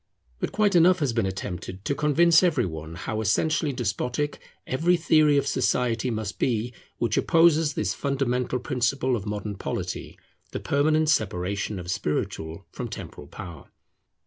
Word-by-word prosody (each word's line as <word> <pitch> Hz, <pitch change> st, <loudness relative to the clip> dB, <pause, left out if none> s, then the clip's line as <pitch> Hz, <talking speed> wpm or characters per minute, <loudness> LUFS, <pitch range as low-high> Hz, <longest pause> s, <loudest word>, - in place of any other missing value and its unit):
But -, -, -2 dB
quite 205 Hz, 0 st, +2 dB
enough 175 Hz, +2 st, +6 dB
has 145 Hz, -8 st, 0 dB
been 115 Hz, -4 st, +1 dB
attempted 95 Hz, 0 st, -6 dB
to -, -, +1 dB
convince 155 Hz, +3 st, +4 dB
every 160 Hz, -9 st, +2 dB
one 80 Hz, -1 st, -6 dB
how 110 Hz, +5 st, -3 dB
essentially 150 Hz, +8 st, +1 dB
despotic 125 Hz, +4 st, -2 dB, 0.3 s
every 170 Hz, +7 st, +2 dB
theory 155 Hz, -3 st, +4 dB
of 140 Hz, -, +2 dB
society 125 Hz, -3 st, +1 dB
must 110 Hz, -3 st, -4 dB
be 120 Hz, -1 st, 0 dB, 0.2 s
which 120 Hz, -, 0 dB
opposes 165 Hz, -3 st, +4 dB
this 100 Hz, -1 st, 0 dB
fundamental 125 Hz, -2 st, -1 dB
principle 125 Hz, +1 st, 0 dB
of 105 Hz, -2 st, -5 dB
modern 105 Hz, -1 st, -4 dB
polity, -, -, -4 dB, 0.4 s
the -, -, -2 dB
permanent 155 Hz, +2 st, +2 dB
separation 100 Hz, -, 0 dB
of 90 Hz, 0 st, -5 dB
spiritual 80 Hz, +2 st, -3 dB
from -, -, -5 dB
temporal -, -, -8 dB
power. 85 Hz, -6 st, -10 dB
125 Hz, 145 wpm, -25 LUFS, 100-150 Hz, 0.4 s, enough